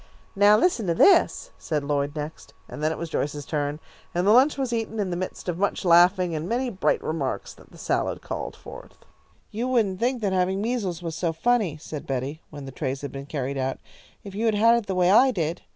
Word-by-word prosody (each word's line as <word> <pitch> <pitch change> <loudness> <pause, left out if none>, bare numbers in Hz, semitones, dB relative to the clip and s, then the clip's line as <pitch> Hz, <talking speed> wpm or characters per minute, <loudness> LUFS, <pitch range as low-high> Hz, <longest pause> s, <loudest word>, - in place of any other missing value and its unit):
"Now 205 +1 +6
listen 235 - +1
to 170 - +1
this," 390 - +4
said 150 -3 -2
Lloyd 145 0 -1
next, 150 +1 -7
and 150 - -8
then 155 +1 +1
it - - -4
was 170 - -4
Joyce's 145 -1 -2
turn, 145 0 -2 0.4
and 175 +1 +1
the 205 - +5
lunch 265 +6 +5
was 260 -3 -2
eaten 225 -1 -3
in 195 -3 -1
the - - -1
midst 185 +1 -5
of 175 -1 -2
much 200 -1 -1
laughing 175 +1 +5
and 160 +3 -3
many 245 +1 -1
bright 190 -3 0
remarks 150 -4 -3
that - - -19
the - - -15
salad - - -1
called - - -5
forth. - - -12 0.5
"You 235 +4 -2
wouldn't 215 -7 +1
think 245 +1 0
that 195 -2 +1
having 185 +1 +1
measles 205 -7 -2
was 165 -2 -4
so 170 0 -1
funny," 195 -1 +1
said 150 -1 -8
Betty, 135 +4 -3
when 145 -2 -9
the 135 - -8
trays 135 0 -4
had 140 - -5
been 140 0 -8
carried 140 -2 -3
out, 130 0 -2 0.5
"if 200 - -9
you 220 +3 -1
had 220 - +2
had 230 +3 +5
it 235 -3 0
the 190 - -2
way 180 0 +3
I 255 +6 +6
did. 170 -7 -2
180 Hz, 230 wpm, -25 LUFS, 150-220 Hz, 0.5 s, Now